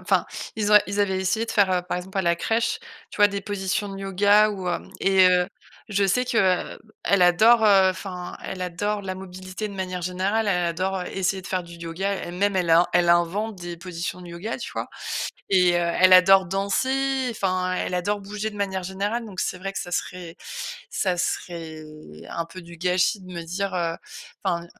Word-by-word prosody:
enfin, - - +2 0.3
ils 215 -2 -1
ont 210 - +9
ils 200 +1 -1
avaient 190 -2 +1
essayé 220 +5 0
de - - -5
faire, 195 -3 +3
heu, 180 - +2
par 180 0 -4
exemple, 190 +2 -5
à - - +4
la 170 0 +2
crèche, 225 +5 0 0.3
tu - - -11
vois, 205 - +7
des 200 0 -3
positions 205 0 -2
de 195 0 -7
yoga 205 +2 +4
ou, 190 -3 -4
hem, 175 - -3
et 190 -1 +5
heu, 180 0 +3 0.4
je 200 -1 +2
sais 250 +6 +1
que, 235 - -2 0.4
heu, - - -14 0.3
elle 200 -2 +3
adore, 220 +6 +6
heu, 195 -2 +6
enfin, 185 -1 -5
elle 185 - -5
adore 205 +4 -2
la 190 -1 -4
mobilité 185 +2 -7
de 205 - -8
manière 185 -2 -4
générale, 190 +5 0
elle 180 -3 +1
adore 185 +3 -1
essayer 190 +1 -1
de - - -11
faire 185 -1 -1
du 170 0 -12
yoga. 170 +4 -3
Elle-même, 190 +2 -1
elle 180 -2 0
a 170 +2 +6
elle 175 0 +3
invente 185 +5 +2
des 175 -1 -7
positions 175 0 -5
de 180 - -10
yoga, 175 +9 -5
tu 235 - -7
vois? - - -4 0.6
Et 180 -2 +4
heu, - - +3
elle 175 +2 +4
adore 190 0 +7
danser, 260 +8 0
enfin, 185 -4 -1
elle 185 - -2
adore 205 +4 0
bouger 205 +2 -4
de 210 - -12
manière 190 -2 -2
générale. 200 +6 -2
Donc 190 -3 -7
c'est 180 - -2
vrai 195 +1 -4
que - - -3
ça 175 - -6
serait 175 -1 -4 0.5
ça 185 - 0
serait 165 -3 -3 0.5
un 170 - -3
peu 170 +2 -11
du 170 0 -12
gâchis 180 +3 +1
de 185 0 -11
me 170 -1 -5
dire, 185 +3 -3
heu, 170 -2 -1 0.5
enfin, 170 0 -1
185 Hz, 210 wpm, -24 LUFS, 180-200 Hz, 0.6 s, ont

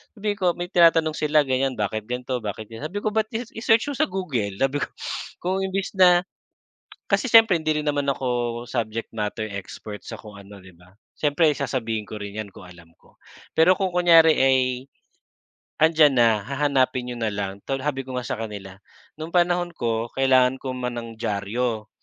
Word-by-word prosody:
sabi 210 0 -3
ko 185 - -1
may 175 0 -4
tinatanong 165 -2 +4
sila 150 0 +3
ganyan 130 0 0
bakit 105 0 -3
ganito, 125 +1 -3
bakit 110 0 -6
sabi 180 +7 -4
ko 215 - 0
ba't 220 0 0
i 235 - -1 0.2
i-search 225 +5 +2
niyoo 270 - -7
sa - - +3
Google 135 - -3
sabi 135 +2 +1
ko. - - -1 0.6
Kung 185 +2 0
imbes 190 +1 -3
na 180 -1 +6 0.9
kasi 260 - +2
siyempre 225 -5 +7
hindi 155 -1 0
rin - - -8
naman 145 -1 0
ako 120 -3 -2
subject 115 -2 -3
matter 110 0 -3
expert 100 +1 -8
sa - - -6
kung 105 -2 -12
ano 100 +1 -13
'di 95 - -14
ba 90 +2 -21 0.2
siyempre 150 +2 +2
sasabihin 115 -5 -2
ko 110 - -7
rin 100 0 -7
yan 110 -2 -5
kung 95 - -12
alam 85 -2 -16
ko. - - -25 0.4
Pero 165 +3 +6
kung 190 -1 0
kunyari 165 -2 +6
ay, 130 0 +4 1.2
andiyan 155 -3 +5
na 115 -2 +4
hahanapin 135 -2 0
niyo 120 - -6
na 115 - 0
lang. 100 -1 -4
Tol 135 -1 -2
sabi 140 -2 -1
ko 130 - -6
nga 125 - -3
sa 125 - -3
kanila 100 -4 -7 0.4
noong 160 +2 -7
panahon 175 0 +2
ko 115 -2 -1
kailangan 130 -1 +4
ko 130 - -3
ma 125 -1 -3
ng 115 -1 -7
diaryo 110 +2 -2
130 Hz, 185 wpm, -23 LUFS, 110-160 Hz, 1.2 s, siyempre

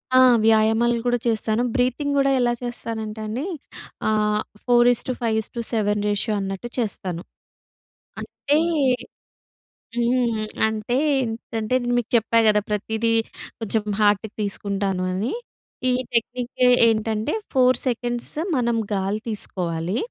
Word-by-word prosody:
ఆ! - - +8 0.3
వ్యాయామాలు 225 +2 +4
కూడా 245 0 +2
చేస్తాను. 220 0 0
బ్రీతింగ్ 255 +3 +1
గూడా 275 0 +3
ఎలా 240 -1 +2
చేస్తానంటే 225 -2 -5
అండి. 250 +9 -3 0.6
ఆహ్, 210 -1 +2 0.2
4:5:7 225 -3 +1
అన్నట్టు 195 +4 -4
చేస్తాను. 190 -6 -3 1.0
అంటే 290 +1 -1 1.4
హ్మ్. 235 -2 +1 0.2
అంటే 220 +2 -2 0.3
ఏంటంటే 225 0 -3
నేన్‌మీకు 245 -1 0
చెప్పా 230 0 +3
కదా 210 -1 +4
ప్రతీదీ 220 +2 -1 0.5
కొంచెం 220 -1 -1 0.2
హార్ట్‌కి 205 +1 +2
తీసుకుంటాను 200 -2 -1
అని. 205 +7 -2 0.6
ఈ - - +3 0.2
టెక్నిక్ 245 +2 -1 0.4
ఏంటంటే 220 +3 0 0.2
4 255 -2 +4
సెకండ్స్ 240 0 -1 0.2
మనం 235 -2 +1 0.2
గాలి 195 +2 -1
తీసుకోవాలి. 180 -3 -2
225 Hz, 100 wpm, -23 LUFS, 210-240 Hz, 1.4 s, ఆ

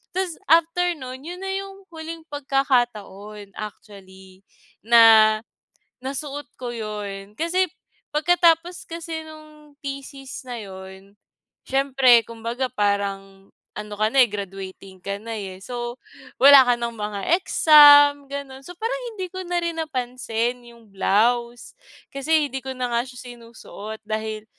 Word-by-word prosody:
'Tas 370 -3 -2
after 335 +2 +3
no'n, 260 -2 -8
'yun 360 +2 -7
na 385 - -3
'yung 390 0 -6
huling 325 0 -8
pagkakataon 240 -8 -2
actually, 190 -3 -11 0.4
na 220 -1 +6 0.6
nasuot 280 +2 -5
ko 245 -2 -5
'yun, 210 -2 -7
kasi 350 +2 0 0.4
pagkatapos 345 +2 +2
kasi 330 -1 -5
nung 305 -2 -15
thesis 275 -2 -8
na 245 -2 -7
'yun, 190 0 -11 0.5
siyempre 265 -3 +4
kumbaga 230 +3 -4
parang 195 -2 -2 0.3
ano 210 0 -7
ka 215 +1 0
na, 275 - 0
eh, - - +5
graduating 195 -2 -8
ka 200 +1 -4
na, 230 0 -6
eh, 190 -1 -8
so 240 +1 -5 0.5
wala 275 -1 +9
ka 245 - +4
nang 235 -1 -4
mga 210 +1 -4
exam, 290 -5 +7
gano'n. 275 -1 -7
So 355 - -9
parang 475 +5 -3
hindi 370 -3 -5
ko 375 - -8
na 350 0 -1
rin 335 -1 -3
napansin 250 -4 -3
'yung 235 -3 -17
blouse 235 +5 0 0.4
kasi 295 +2 +1
hindi 265 +1 -5
ko 265 0 -6
na 250 -1 -3
nga 235 0 +2
siya 250 -1 -12 0.2
sinusuot 220 -2 -10
dahil 215 0 -4
245 Hz, 135 wpm, -23 LUFS, 210-300 Hz, 0.6 s, wala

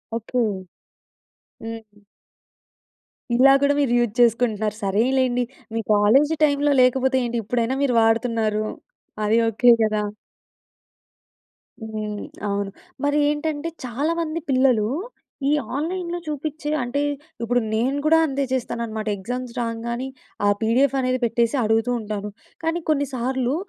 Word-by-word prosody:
Okay. 235 +2 -4 1.2
హ్మ్. 220 -2 -9 1.3
ఇలా 270 +3 +7
కూడా 285 0 +4
మీరు 275 -4 +1
యూజ్ 240 -3 0
చేసుకుంటున్నారు. 225 -3 +2
సరేలెండి! 245 +5 +2 0.3
మీ 230 - -1
కాలేజీ 265 +10 +4
టైమ్‌లో 290 0 +3
లేకపోతే 260 +1 +3
ఏంటి? 235 0 -1
ఇప్పుడైనా 240 +3 0
మీరు 260 -3 +2
వాడుతున్నారు. 225 -1 +1 0.6
అది 220 +2 +3
ఓకే, 240 +3 +5
కదా! 215 -1 +1 1.8
హ్మ్. 215 -1 -4 0.3
అవును. 200 0 -2 0.3
మరి 290 +1 +2
ఏంటంటే, 300 +1 -2 0.2
చాలా 275 +7 -1
మంది 325 0 -2
పిల్లలు 255 -5 +3 0.6
ఈ - - +3 0.3
ఆన్‌లైన్‌లో 350 +3 -3
చూపించే 300 0 -4
అంటే, 245 +4 -1 0.4
ఇప్పుడు 245 +2 +2
నేను 255 +6 +1
కూడా 325 +1 +5
అంతే 275 -1 -1
చేస్తానన్నమాట, 230 -3 -3
ఎగ్జామ్స్ 245 +5 -5
రాంగానే 235 +2 -3 0.4
ఆ - - +4
పిడిఎఫ్ 250 +5 +2
అనేది 255 0 0
పెట్టేసి 235 +3 +1
అడుగుతుంటాను. 220 -2 -1 0.3
కానీ, 325 +1 0
కొన్ని 285 -2 +2
సార్లు 255 +2 -1
245 Hz, 115 wpm, -23 LUFS, 225-280 Hz, 1.8 s, ఇలా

